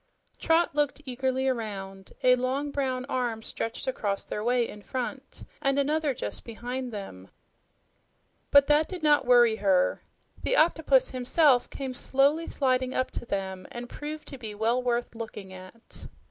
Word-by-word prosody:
Trot 330 0 +2
looked 295 0 0
eagerly 260 +1 -1
around. 195 -6 -4
A 250 - +7
long, 260 +3 -1
brown 260 -3 -1
arm 240 -5 -2
stretched 225 +1 -4
across 205 -6 -2
their 210 - -4
way 240 0 +2
in 210 - -10
front 260 +5 -5 0.2
and 275 -2 +1
another 295 0 +1
just - - -4
behind 245 +2 -5
them, 145 - -8 1.2
but 280 -1 +7
that 295 +2 +3
did 360 -4 -7
not 295 -4 +4
worry 240 -3 +6
her. 190 -3 +2 0.4
The - - +1
octopus 315 - +3
himself 255 +1 +3
came 265 -2 -5
slowly 280 +6 +2
sliding 255 -2 0
up 255 - 0
to - - -5
them 190 -2 -4
and 240 0 -6
proved 300 +4 -7
to 275 - -9
be 215 -3 -7
well 230 +4 +1
worth 245 -1 -1
looking 215 -4 -8
at. 185 +5 -12
255 Hz, 155 wpm, -27 LUFS, 225-280 Hz, 1.2 s, A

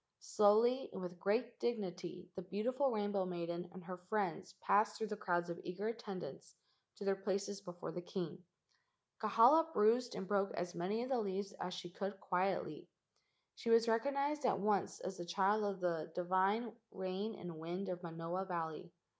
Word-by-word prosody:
Slowly 225 +5 +4
and - - -4
with 180 0 -6
great 230 +5 0
dignity 180 -5 -3
the 190 - -5
beautiful 240 +9 +1
rainbow 205 -4 +1
maiden 175 0 -3
and 190 -1 -10
her 180 +1 -6
friends 185 0 -2
passed 210 +1 +3
through 220 - -2
the 210 - -2
crowds 175 -3 0
of 170 - -5
eager 190 +5 -2
attendants 210 -5 -6 0.4
to 200 - -7
their 195 0 +3
places 195 +1 -2
before 175 -2 -6
the 175 - -4
king. 180 0 -4 0.8
Kahala 245 +10 +6
bruised 235 +1 +3
and 190 - -4
broke 200 0 +1
as 175 +1 -2
many 200 +7 -1
of 255 - -5
the 260 -3 +2
leaves 200 -1 -2
as 180 0 -3
she 175 -1 -6
could 195 +1 -4
quietly. 185 +1 -1 0.7
She 230 - -4
was 230 0 +6
recognized 280 +5 +1
at 250 - +3
once 205 -1 +1
as 185 +1 -4
the 175 - -4
child 200 +4 +3
of 200 -2 -1
the 165 -3 -1
divine 190 +6 +2 0.2
rain 190 +3 -3
and 170 -3 -7
wind 175 +5 -3
of 180 -1 -3
Manoa 170 +2 -3
Valley. 170 -1 -3
195 Hz, 170 wpm, -37 LUFS, 180-215 Hz, 0.8 s, Kahala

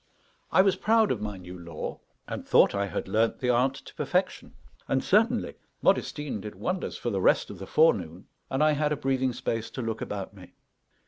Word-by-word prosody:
I 190 - +6
was 195 -2 +2
proud 220 0 +3
of 115 - -2
my 105 -2 -4
new 90 0 -10
lore, 85 -2 -6 0.3
and - - -5
thought - - +5
I 100 0 0
had 95 - -4
learned 110 +4 +1
the 125 -1 +1
art 130 +3 +2
to - - -12
perfection. - - -2 0.3
And 135 - +1
certainly 225 +4 +2 0.3
Modestine 145 -8 0
did 105 0 -8
wonders 180 0 -3
for 120 - -3
the 95 -2 -1
rest - - +3
of - - -10
the 95 - -7
forenoon, 95 - +2 0.2
and 135 +3 +1
I 155 - +5
had 150 0 0
a 150 - 0
breathing 130 -2 0
space 115 -1 -3
to 130 - -5
look 115 -1 -3
about 100 -1 -5
me. 95 -3 -14
125 Hz, 200 wpm, -27 LUFS, 100-150 Hz, 0.3 s, I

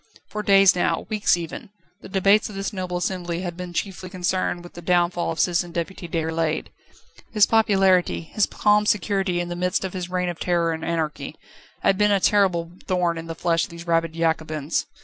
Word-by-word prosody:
For 210 - -4
days 195 -2 +6
now, 175 - 0
weeks 210 -4 +2
even, 170 +2 -7 0.3
the - - -11
debates 195 +3 +3
of 210 - -9
this 195 +2 -3
noble 185 -2 -3
assembly 175 -1 -3
had 175 -2 -4
been 180 0 -7
chiefly 185 +1 -4
concerned 180 -1 -1
with 175 - -12
the 175 - -9
downfall 175 0 +1
of 165 - -5
Citizen 175 -1 +1
Deputy 170 +2 -4
Déroulède. 160 -1 -1 0.6
His 210 -2 +5
popularity, 195 -6 +3
his 200 +5 0
calm 210 0 +2
security 195 -2 +1
in 175 0 -3
the 175 - -4
midst 180 +2 -1
of 190 - -4
this 180 -1 -5
reign 180 0 -1
of 175 - -6
terror 170 -2 +1
and 160 0 -4
anarchy, 160 -3 -3 0.5
had 195 0 +3
been 210 0 +4
a 200 -1 +3
terrible 180 -4 +2 0.2
thorn 175 -2 0
in 165 - -8
the 165 - -5
flesh 165 0 +1
of - - -15
these 170 0 -10
rabid 165 -1 +1
Jacobins. 160 -2 -1
180 Hz, 195 wpm, -23 LUFS, 170-195 Hz, 0.6 s, days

